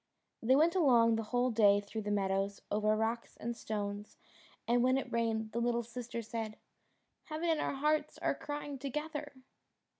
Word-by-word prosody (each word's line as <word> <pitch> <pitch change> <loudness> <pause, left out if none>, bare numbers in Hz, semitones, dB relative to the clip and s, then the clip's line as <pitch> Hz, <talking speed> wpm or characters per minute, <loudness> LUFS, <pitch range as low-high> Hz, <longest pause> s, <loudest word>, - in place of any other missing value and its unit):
They 255 +3 +4
went 320 +4 +4
along 240 -9 +5
the 225 0 -2
whole 245 0 +2
day 205 -3 +5
through 205 +2 -5
meadows, 200 -1 -1
over 215 +1 +2
rocks 225 +2 -2
and 235 +1 -4
stones, 205 -2 -4 0.5
and 240 +1 +3
when 255 +1 +4
it 270 - -4
rained 225 -1 0
the 235 - -1
little 235 0 +1
sister 235 0 -6
said, 220 -1 -5 0.7
"Heaven 320 +1 -2
and 315 - +1
our - - -1
hearts 300 +2 +1
are - - 0
crying 290 -2 -5
together." 295 +2 -4
235 Hz, 160 wpm, -33 LUFS, 215-270 Hz, 0.7 s, along